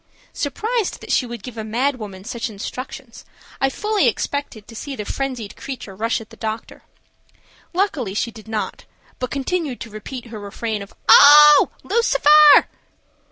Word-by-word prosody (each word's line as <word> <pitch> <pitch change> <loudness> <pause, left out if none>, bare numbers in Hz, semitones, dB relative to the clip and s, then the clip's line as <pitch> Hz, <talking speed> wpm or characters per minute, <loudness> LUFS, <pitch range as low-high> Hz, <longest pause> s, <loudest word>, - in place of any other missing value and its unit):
Surprised 435 - -2
that - - -8
she 250 - +1
would 235 -4 -8
give 235 -3 -8
a - - -4
mad 255 +6 -1
woman 195 -4 -9
such 235 +2 -4
instructions, 240 +3 -8 0.4
I 270 - +3
fully 425 +7 0
expected 285 -7 -3
to 225 - -12
see 275 +4 -6
the 210 - -6
frenzied 255 -6 -4
creature 245 -8 -8
rush 225 +4 -1
at 225 - -13
the - - -14
doctor. 220 0 -6 0.9
Luckily 320 - -1
she 235 +2 -1
did 220 -1 -14
not, 220 -1 -4 0.3
but 255 - -3
commenced 285 -1 -3
to 230 - -12
repeat 235 +4 -8
her 215 - -6
refrain 210 +1 -4
of 200 - -11
"Oh, 295 0 +8
Lucifer." 305 -9 +5
250 Hz, 160 wpm, -20 LUFS, 220-285 Hz, 0.9 s, Oh